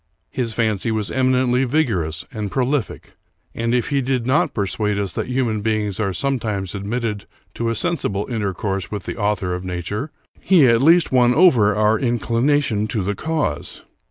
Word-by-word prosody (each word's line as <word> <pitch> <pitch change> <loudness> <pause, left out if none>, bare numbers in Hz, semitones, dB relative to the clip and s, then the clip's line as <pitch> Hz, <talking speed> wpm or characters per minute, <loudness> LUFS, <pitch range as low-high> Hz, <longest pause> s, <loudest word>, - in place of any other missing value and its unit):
His 115 -4 -3
fancy 110 -1 0
was 110 -2 -2
eminently 130 -1 +2
vigorous 110 - -1
and 105 -2 -3
prolific; 130 +2 -2 0.4
and, 115 0 -2
if 125 - 0
he 140 -2 +1
did 130 -2 -1
not 130 +4 +2
persuade 105 0 -1
us 100 -2 -2
that - - -3
human 125 -4 -1
beings 105 -2 -1
are 100 -3 0
sometimes 105 -3 -2
admitted 105 +1 -3 0.3
to 115 0 -2
a 115 - -1
sensible 105 - -1
intercourse 100 -4 -3
with 105 -3 -5
the - - -5
Author 100 -3 -1
of 90 +1 -4
nature, 95 - -4 0.3
he 175 -7 +5
at 115 0 +4
least 165 +4 +5
won 125 -1 +4
over 120 - +5
our 105 +1 +2
inclination 120 -1 +1
to 110 -3 -2
the 100 +2 -1
cause. 155 - -3
110 Hz, 165 wpm, -20 LUFS, 100-130 Hz, 0.4 s, he